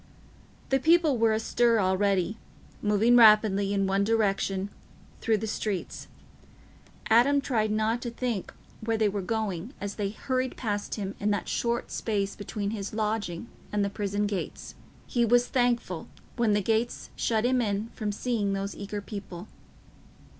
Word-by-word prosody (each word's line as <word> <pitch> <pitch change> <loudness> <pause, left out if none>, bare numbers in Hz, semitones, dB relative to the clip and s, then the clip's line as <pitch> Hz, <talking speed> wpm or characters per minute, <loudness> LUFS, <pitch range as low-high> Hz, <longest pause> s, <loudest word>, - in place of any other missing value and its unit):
The 270 - +3
people 315 -3 +4
were 225 -1 +4
astir 230 +1 +2
already, 195 +1 +1 0.4
moving 210 +3 +4
rapidly, 210 -3 +6
in 195 -1 +1
one 195 +1 +2
direction, 200 -2 0 0.5
through 225 -1 +2
the 215 - -3
streets. 210 -3 -3 1.0
Adam 260 +6 +5
tried 225 -6 0
not 220 +2 0
to 240 - -3
think 235 -5 -3 0.3
where 225 0 0
they 215 -1 +3
were 200 0 -2
going, 215 - -3
as 200 0 -4
they 200 - 0
hurried 255 +4 -2
past 205 -4 -2
him 200 -2 -4
in 205 - 0
that 205 - -1
short 235 0 -1
space 200 -3 -1
between 205 0 -4
his 205 -1 -5
lodging 215 -3 -2 0.2
and 205 -1 +1
the 200 - -3
prison 205 0 -1
gates. 205 -2 -4 0.3
He 240 - +1
was 240 +1 +4
thankful 240 -10 0 0.3
when 235 -3 +2
the 205 -1 +1
gates 225 +3 -1
shut 220 0 0
him 255 0 +3
in 210 0 -1
from 215 -3 -3
seeing 210 -2 -1
those 195 +1 -3
eager 205 +1 -5
people. 195 -2 -8
215 Hz, 155 wpm, -28 LUFS, 200-235 Hz, 1.0 s, rapidly